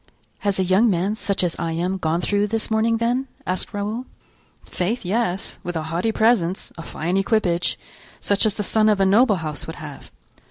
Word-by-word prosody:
"Has 200 -2 0
a - - +3
young 190 +6 +4
man, 190 +2 +1
such 200 -3 0
as 175 -2 0
I 165 -1 -1
am, 180 +3 -1
gone 165 +1 0
through 205 +2 +1
this 225 +1 -2
morning, 225 +1 +2
then?" 245 +4 0 0.2
asked 185 0 -2
Raoul. 210 +5 -3 0.6
"Faith, 195 +5 -2
yes, 195 -1 -1
with 175 0 -5
a 160 - -2
haughty 180 +7 +1
presence, 220 -5 +1
a 165 - -7
fine 170 +3 -2
equipage; 195 -4 +1 0.4
such 205 +2 +2
as 210 - 0
the 210 - -2
son 215 +2 +3
of 210 -2 +2
a 195 - +4
noble 210 +3 +5
house 155 -5 -4
would - - -6
have." - - -10
200 Hz, 195 wpm, -22 LUFS, 175-220 Hz, 0.6 s, noble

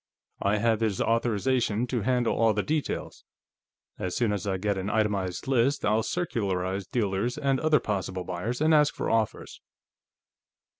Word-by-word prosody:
"I 100 +2 +2
have 110 0 +2
his 110 -4 0
authorization 115 0 +1
to 125 -2 -2
handle 125 +1 +1
all 115 -2 +3
the 105 - 0
details. 155 -1 -3 0.8
As 90 -1 -3
soon 115 -4 +1
as 100 0 -3
I 95 -1 0
get 100 +1 -1
an 95 +1 -3
itemized 100 -4 -1
list, 135 +2 +2
I'll 110 +2 +3
circularize 100 - -2
dealers 110 +2 -1
and 135 -3 +1
other 155 -2 +3
possible 95 -4 -3
buyers 95 +9 -4
and 160 +1 +4
ask 150 -1 +4
for - - -2
offers." 110 -1 -1
110 Hz, 155 wpm, -27 LUFS, 100-125 Hz, 0.8 s, and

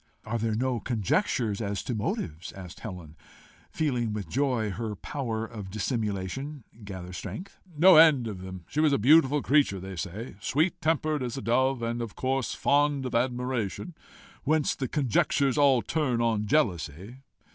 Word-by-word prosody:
"Are 115 +1 -2
there 110 -1 0
no 125 +1 0
conjectures 115 - 0
as 100 -2 -2
to 125 - -3
motives?" 90 -6 -3
asked 90 -3 -10
Helen, 90 -7 -8 0.5
feeling 125 -8 -1
with 105 -2 -4
joy 125 -5 0
her 105 +3 -4
power 115 -3 -3
of 105 -4 -8
dissimulation 110 +6 -3 0.2
gather 95 -3 -7
strength. 185 - -7 0.2
"No 180 +2 +8
end 155 -6 +7
of 100 -5 -5
them. 95 -2 -8
She 150 - -3
was 155 -2 +4
a - - +4
beautiful 145 +3 +5
creature, 140 -9 +3
they 95 +1 -7
say, 95 +4 -6
sweet 160 - 0
tempered 155 -2 +1
as 125 0 -3
a - - -4
dove, 130 +1 +1
and 120 +1 -2
of 115 -3 -6
course 130 0 -1
fond 145 -1 +2
of 125 - -4
admiration 125 - -1 0.5
whence 155 0 +2
the 130 - -3
conjectures 135 +1 +1
all 140 -5 +4
turn 135 -7 0
on 110 -3 +1
jealousy. 100 - 0
120 Hz, 160 wpm, -28 LUFS, 105-140 Hz, 0.5 s, No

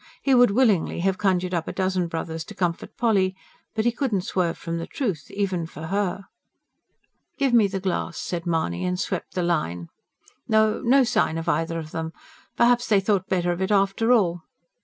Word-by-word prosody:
He 270 - +3
would 245 -1 +6
willingly 205 -7 +2
have 190 +1 0
conjured 185 -2 +1
up 170 -2 -1
a - - -2
dozen 185 -2 0
brothers 165 -1 -4
to - - -11
comfort 175 -2 -3
Polly; 195 -6 +2 0.4
but 220 0 0
he 240 - +4
could 255 +1 -2
not 190 -3 0
swerve 175 -3 -1
from 165 0 -4
the 165 - -5
truth, 195 - -3
even 185 -5 -2
for 160 -1 -9
her. 195 -1 -1 1.1
"Give 275 -3 +1
me 225 -4 +6
the 195 0 -3
glass," 185 -2 -2
said 175 -1 -4
Mahony, 160 - -1
and 180 0 -1
swept 185 -2 -4
the 180 - 0
line. 90 - -1 0.6
"No, 220 -1 +3
no 265 +3 +5
sign 215 -8 +1
of 165 +1 -5
either 165 +1 0
of 155 -1 -6
them. 160 0 -4 0.4
Perhaps 240 +1 +3
they 205 -2 +4
thought 195 -1 0
better 175 -2 +1
of 175 +1 -3
it 190 - 0
after 200 +3 +2
all. 175 -8 +3
185 Hz, 195 wpm, -24 LUFS, 170-215 Hz, 1.1 s, would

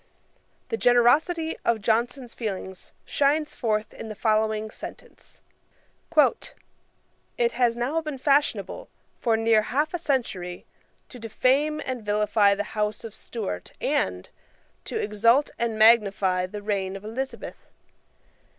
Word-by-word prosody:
[*] - - -41
The 455 - -1
generosity 310 - +3
of 235 -1 +1
Johnson's 235 +4 -1
feelings 190 -4 -6
shines 295 +2 +1
forth 215 -2 -1
in 220 - -8
the 215 - -6
following 215 0 0
sentence: - - -11 2.0
"It 475 -1 +2
has 240 -2 +2
now 265 +7 -1
been 305 -3 -5
fashionable, 290 - 0 0.3
for 230 -2 +2
near 225 -1 +4
half 295 +8 -1
a 350 - -2
century, 195 - -2 0.4
to 250 - -11
defame 270 +7 +1
and 255 -3 -4
vilify 210 -1 +3
the 205 - -2
house 210 0 -2
of 225 -2 -8
Stuart 205 - -6
and, 90 0 -1 0.6
to - - -4
exalt 230 +7 +2
and 230 -2 -1
magnify 200 -5 +4
the 205 +2 -8
reign 195 -2 -2
of 195 +1 -9
Elizabeth. 265 +5 -6
225 Hz, 125 wpm, -25 LUFS, 210-270 Hz, 2.0 s, near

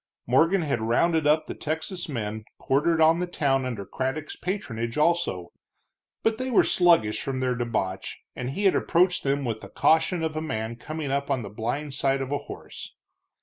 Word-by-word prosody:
Morgan 165 +9 +3
had 140 -7 -1
rounded 155 +8 +2
up 155 +1 +3
the - - -5
Texas 160 +3 -4
men 110 -5 -4
quartered 155 +5 +1
on 160 +1 +5
the 180 - -1
town 135 -6 +1
under 115 -6 -4
Craddock's 135 +7 -3
patronage, 120 - -3
also, 150 - +1 0.7
but 225 0 +1
they 260 0 -2
were 240 - +5
sluggish 170 -12 +3
from 135 -1 -3
their 130 -1 +1
debauch, 115 -6 -2 0.2
and 125 0 -4
he 170 +10 -3
had 195 - +5
approached 180 +1 +2
them 140 0 0
with 110 -2 -3
the - - -10
caution 160 +2 +2
of 160 -1 -2
a 155 - -1
man 110 -7 -3
coming 155 +3 -5
up 140 +1 -1
on 130 -4 0
the 100 - -6
blind 120 +7 -3
side 135 0 +1
of 135 - -7
a 145 - 0
horse. - - -9
140 Hz, 190 wpm, -26 LUFS, 120-165 Hz, 0.7 s, on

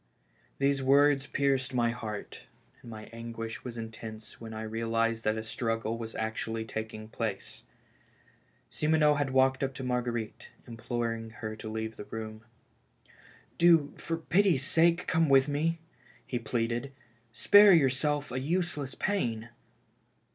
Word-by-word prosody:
These 140 0 +1
words 140 +1 +4
pierced 135 -2 0
my 120 -1 +2
heart, 110 -3 -7 0.4
and 120 - -12
my 110 -1 -8
anguish 115 0 -6
was 120 -2 -7
intense 110 -1 -8
when 115 -1 -7
I 110 0 -5
realized 115 +1 -1
that 110 +1 +1
a 110 - -3
struggle 115 0 -2
was 115 -1 -7
actually 110 0 -3
taking 110 0 -6
place. 110 -3 -4 1.1
Simoneau 150 -1 +3
had 145 -2 0
walked 130 0 +3
up 135 -1 -2
to 130 - -6
Marguerite, 120 -3 -3 0.2
imploring 115 -1 -3
her 110 -1 -6
to 110 0 -7
leave 110 0 -4
the 105 - -7
room. 110 0 -7 0.6
" - - -26
Do, 165 -4 +5
for 165 - -3
pity's 175 -3 +2
sake, 170 +3 +3
come 160 -3 +2
with 135 0 +5
me," 155 +3 0 0.5
he 125 - -3
pleaded. 120 +3 -2 0.4
"Spare 205 - +7
yourself 145 -1 +2
a 130 - -2
useless 150 -2 -1
pain." 120 - -1
120 Hz, 140 wpm, -30 LUFS, 110-140 Hz, 1.1 s, Spare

